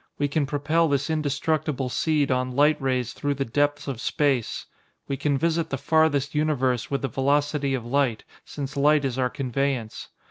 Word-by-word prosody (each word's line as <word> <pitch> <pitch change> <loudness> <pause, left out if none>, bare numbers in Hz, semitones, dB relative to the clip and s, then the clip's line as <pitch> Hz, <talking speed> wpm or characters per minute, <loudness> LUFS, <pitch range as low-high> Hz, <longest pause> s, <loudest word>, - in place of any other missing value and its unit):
We 145 - +1
can 145 0 0
propel 150 +4 +1
this 145 +1 0
indestructible 150 -2 -1
seed 145 +1 +1
on 130 0 -1
light 150 +2 +3
rays 130 -2 -1
through 145 0 -2
the 135 0 -2
depths 145 +4 0
of 130 -4 -4
space. 135 -6 0 0.4
We 140 - -1
can 140 +1 0
visit 165 +2 0
the 140 - -2
farthest 145 -2 +2
universe 135 -5 0
with 140 -2 -2
the - - +1
velocity 140 +2 0
of 120 -3 -5
light, 125 -3 0 0.2
since 140 0 -6
light 145 +1 +3
is 130 -1 -2
our 125 -1 +2
conveyance. 130 -3 -3
140 Hz, 175 wpm, -25 LUFS, 130-150 Hz, 0.4 s, light